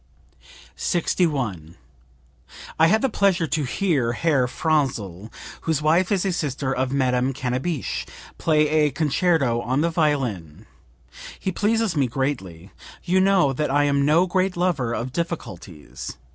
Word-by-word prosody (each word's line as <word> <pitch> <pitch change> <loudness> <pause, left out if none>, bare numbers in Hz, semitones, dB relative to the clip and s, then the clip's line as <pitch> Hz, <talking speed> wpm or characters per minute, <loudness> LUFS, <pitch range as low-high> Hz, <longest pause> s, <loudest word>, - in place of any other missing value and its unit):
61. 130 - -1 1.0
"I 160 - +6
had 220 +7 +2
the - - +4
pleasure 195 -7 +1
to 155 -1 -1
hear 135 -5 0
Herr 140 -3 +1
Franzl 120 - -1 0.3
(whose 160 -3 +1
wife 170 +5 +2
is 200 -1 +1
a 190 - +1
sister 140 -5 -2
of 130 0 -1
Madame 130 -1 +1
Cannabich) 130 +4 -3 0.3
play 155 -2 +3
a 150 0 +2
concerto 145 -3 +1
on 130 +4 0
the 170 +1 +1
violin. 115 - -1 0.7
He 190 - -2
pleases 215 0 0
me 140 -3 +2
greatly. 100 - -4 0.3
You 185 +1 +2
know 190 -8 +3
that 150 +2 -1
I 145 +2 +3
am 140 -1 +2
no 155 +5 +4
great 185 0 0
lover 170 -10 0
of 120 +2 -4
difficulties. 110 - -6
145 Hz, 135 wpm, -23 LUFS, 125-170 Hz, 1.0 s, I